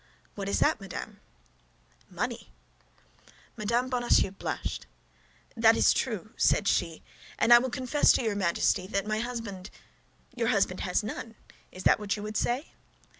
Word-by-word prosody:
"What 200 -1 -5
is - - 0
that, 300 -7 +2
madame?" 195 -2 -7 0.9
"Money." - - -4 1.0
Mme. 235 +4 0
Bonacieux 240 -6 +2
blushed. 195 - -5 0.6
"Yes, - - -28
that 225 0 +5
is - - +5
true," 220 -4 -3
said 200 - +2
she, 165 -4 0 0.3
"and 235 +2 +5
I 240 - +10
will 260 +2 -2
confess 255 +4 +2
to - - 0
your 220 -3 -1
Majesty 185 0 +1
that 195 -1 -2
my 215 0 -1
husband—" 225 -5 -5 0.7
"Your 235 -2 -1
husband 200 -5 +1
has 180 +3 0
none. 225 +1 -6 0.4
Is 185 - -9
that - - +4
what 210 0 -2
you 205 - -6
would 215 0 -6
say?" 245 +7 -1
215 Hz, 155 wpm, -28 LUFS, 195-240 Hz, 1.0 s, I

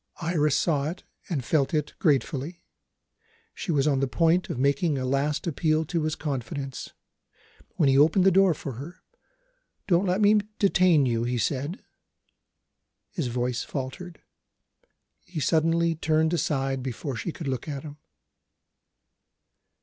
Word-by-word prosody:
Iris 155 -4 +1
saw 150 -3 +1
it, 175 - -8 0.3
and 140 -9 -2
felt 150 +1 +1
it 150 -1 -1
gratefully. 150 +1 0 0.9
She - - -4
was 140 -3 +2
on 140 -3 +2
the 135 - +1
point 165 +6 +2
of - - -3
making 140 +3 +1
a 130 - -2
last 140 +3 0
appeal 160 -1 +1
to 165 +2 -1
his 155 0 -1
confidence, 135 -1 -5 0.9
when 155 - +2
he 135 0 +4
opened 160 +6 +5
the 195 - +6
door 190 -2 +4
for 140 - -6
her. 175 +6 -11 0.8
"Don't 185 +1 +2
let 180 +2 +1
me 210 0 +5 0.2
detain 180 -7 +4
you," 115 -2 0
he 120 +1 -1
said. 140 - -2 1.3
His 165 -9 -2
voice 125 0 -2
faltered; 150 +6 -6 1.0
he 175 -3 -6
suddenly 165 +2 +2
turned 160 +1 +1
aside 135 -4 -1
before 130 +2 -4
she 170 - -4
could 160 -2 -7
look 130 0 -3
at 140 -1 -5
him. 150 -1 -9
150 Hz, 140 wpm, -26 LUFS, 135-170 Hz, 1.3 s, the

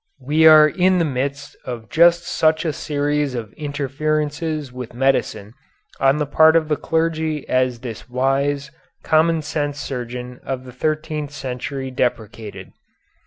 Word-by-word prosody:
We 155 +4 +4
are 155 -1 +9
in 185 +3 +2
the 170 - +2
midst 140 +1 -3
of 120 -3 -6
just 170 +1 +4
such 160 0 +1
a 155 - 0
series 145 -2 -1
of 110 -4 -6
interferences 150 0 -2
with 125 -2 -8
medicine 125 -5 0 0.5
on 135 +2 +3
the 150 - 0
part 160 +3 +5
of 160 -2 +2
the 150 - +2
clergy 160 -1 -1
as 130 -2 0
this 120 -1 -8
wise, 140 +2 0 0.3
common 160 0 +2
sense 145 -1 -3
surgeon 125 -2 -6
of 130 -1 -4
the 125 - -10
thirteenth 155 +2 -2
century 130 -1 -5
deprecated. 115 -4 -3
145 Hz, 140 wpm, -20 LUFS, 125-155 Hz, 0.5 s, are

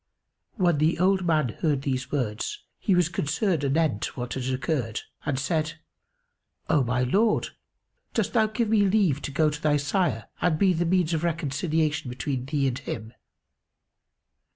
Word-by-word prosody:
When 175 -8 +2
the 155 +2 +2
old 190 +1 +2
man 155 -6 +2
heard 145 -4 +1
these 130 -2 -2
words 130 - -2 0.2
he 195 - +2
was 180 -2 +3
concerned 170 0 0
anent 140 -6 0
what 120 -1 -4
had 130 -2 -3
occurred 130 -4 -1 0.3
and 140 -3 0
said, 155 +3 -1 1.0
"O 145 - +4
my 125 +1 0
lord, 210 - +2 0.7
dost - - 0
thou 220 -3 +4
give 215 +1 -1
me 220 -1 +4
leave 190 -8 +2
to - - -4
go 155 +2 +2
to 150 +1 -6
thy 150 -1 +3
sire 145 - 0
and 175 -3 +2
be 190 +2 +4
the 175 +1 0
means 175 -2 +2
of 160 0 -1
reconciliation 155 -2 0
between 125 +1 -3
thee 140 -1 +1
and 130 0 -2
him?" 110 -4 -6
155 Hz, 160 wpm, -26 LUFS, 135-180 Hz, 1.0 s, O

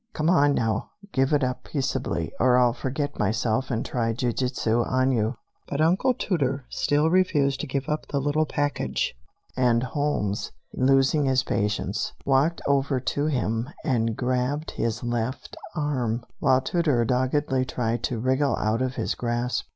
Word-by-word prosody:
Come 155 +2 +1
on, 145 -5 +4
now, 110 -2 -1 0.2
give 135 +1 +1
it 145 -2 +3
up 125 0 -2
peaceably, 130 - -2
or 125 0 +5
I'll 125 -2 +4
forget 145 +4 -3
myself 110 +4 0
and 115 -3 -1
try 115 -2 -1
jiu 120 +1 -1
jitsu 120 -2 0
on 130 +2 +1
you." 115 0 0 0.3
But 140 - -3
Uncle 185 +11 +3
Tooter 140 - -1
still 150 +2 +1
refused 150 -7 +2
to - - -4
give 135 0 -2
up 150 0 -2
the 140 - -1
little 145 +3 +1
package, 145 - -1 0.4
and 120 -2 +3
Holmes, 130 -7 -1 0.2
losing 135 +3 +3
his 130 -1 +2
patience, 105 -2 -1
walked 140 +5 +2
over 140 -1 +2
to 145 +4 -1
him 120 -3 -1
and 115 -4 0
grabbed 130 +4 -1
his 115 0 -2
left 120 +2 -3 0.2
arm, 125 -7 -1
while 130 0 +3
Tooter 145 -8 +1
doggedly 130 +2 +1
tried 120 -2 -2
to 125 - -2
wriggle 130 +4 +1
out 110 +3 0
of 130 0 -1
his - - -1
grasp. 120 +1 -2
130 Hz, 160 wpm, -25 LUFS, 120-145 Hz, 0.4 s, or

